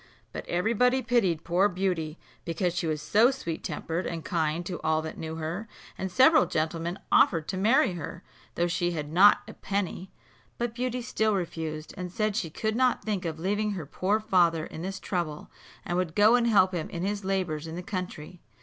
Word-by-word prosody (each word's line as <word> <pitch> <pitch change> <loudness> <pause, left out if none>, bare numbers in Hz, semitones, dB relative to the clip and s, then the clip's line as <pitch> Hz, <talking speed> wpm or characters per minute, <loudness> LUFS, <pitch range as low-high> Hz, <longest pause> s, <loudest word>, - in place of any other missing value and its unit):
But - - -7
every 180 +7 +1
body 250 +3 +3
pitied 205 -9 +1
poor 180 +4 +3
Beauty, 175 -4 -2 0.3
because 175 +1 -1
she 175 -1 -2
was 155 -1 -2
so 220 +9 +5
sweet 170 -12 -4
tempered 165 +2 -3
and 165 -2 -5
kind 165 -1 -1
to 175 -1 -5
all 155 0 +1
that 160 - -7
knew 160 0 -5
her; 165 +7 -4 0.3
and 190 -1 -4
several 265 - +6
gentlemen 165 +3 -2
offered 165 -4 +4
to 190 - -2
marry 215 +1 +3
her, 170 +1 -7 0.3
though 175 - +1
she 175 0 0
had 150 -2 -4
not 190 +5 +6
a - - -9
penny; 190 -2 -3 0.5
but 240 -1 -2
Beauty 250 0 -2
still 220 -2 +1
refused, 160 -4 -4
and 180 -2 -5
said 215 +1 -1
she 170 -6 -1
could 220 +7 -2
not 255 0 +2
think 200 -4 -2
of 160 -1 -3
leaving 205 +5 0
her 175 -6 -5
poor 190 +8 0
father 175 -7 +2
in 160 - -8
this 195 +2 -4
trouble 170 -5 -3 0.3
and 175 - -1
would 170 -3 -2
go 210 +2 +6
and 240 -1 +4
help 195 -4 +4
him 170 -3 -3
in 170 - -4
his 205 0 -2
labours 180 -5 -1
in 160 - -6
the 180 - -5
country. 180 -3 -6
180 Hz, 200 wpm, -28 LUFS, 165-210 Hz, 0.5 s, several